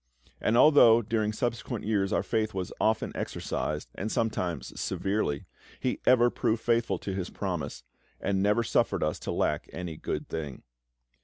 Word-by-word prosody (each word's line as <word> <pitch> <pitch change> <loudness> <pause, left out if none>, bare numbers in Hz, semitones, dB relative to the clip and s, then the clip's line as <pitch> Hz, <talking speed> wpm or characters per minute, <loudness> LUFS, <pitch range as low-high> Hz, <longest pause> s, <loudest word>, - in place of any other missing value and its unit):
And 115 - +2
although 120 -5 +7
during 110 0 0
subsequent 115 +1 -3
years 100 -3 +1
our - - +1
faith 110 -2 -1
was 90 -2 -3
often 110 0 +1
exercised, - - -3
and 105 +3 -4
sometimes 95 -7 -2
severely, 95 -8 -1 0.3
He 125 - -1
ever 120 -1 +6
proved 110 +1 0
faithful 115 -5 +2
to 95 - -5
His 95 -2 -3
promise, 65 - -4 0.4
and 95 -1 0
never 105 +4 +3
suffered - - +1
us - - -1
to - - -4
lack - - 0
any 85 -2 -5
good - - -4
thing. 75 -5 -5
110 Hz, 155 wpm, -29 LUFS, 95-115 Hz, 0.4 s, although